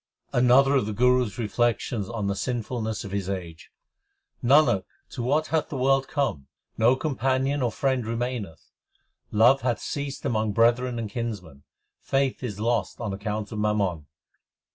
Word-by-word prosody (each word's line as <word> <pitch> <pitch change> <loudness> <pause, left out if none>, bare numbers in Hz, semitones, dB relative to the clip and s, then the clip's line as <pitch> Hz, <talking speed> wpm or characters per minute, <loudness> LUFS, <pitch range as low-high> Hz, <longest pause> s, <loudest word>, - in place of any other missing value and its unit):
Another 125 +3 +5
of 105 - 0
the 110 - -3
Guru 125 +2 +3
s 105 - -11
reflections 115 -2 -1
on 115 -3 -3
the 100 0 0
sinful 120 +1 -3
ness 110 -1 -3
of 100 - -8
his 100 -1 -2
age: 85 -4 -6 0.7
Nanak, 135 -6 +5 0.3
to 125 - -5
what 145 +6 +1
hath 160 -1 0
the 140 - -4
world 135 +1 +2
come? 110 - -2 0.3
No 120 +3 +4
companion 135 0 0
or 120 -2 +1
friend 130 0 0
remaineth. 115 -6 -4 0.6
Love 120 +6 +5
hath 120 -3 0
ceased 140 0 -5
among 110 -5 0
brethren 120 +2 +2
and 115 -2 -3
kinsmen; 100 - -6 0.3
Faith 135 -1 0
is 105 -6 -5
lost 115 -3 -1
on 110 -4 -3
account 105 +1 -4
of 110 - -4
mammon. 100 -8 0
120 Hz, 160 wpm, -26 LUFS, 105-130 Hz, 0.7 s, Another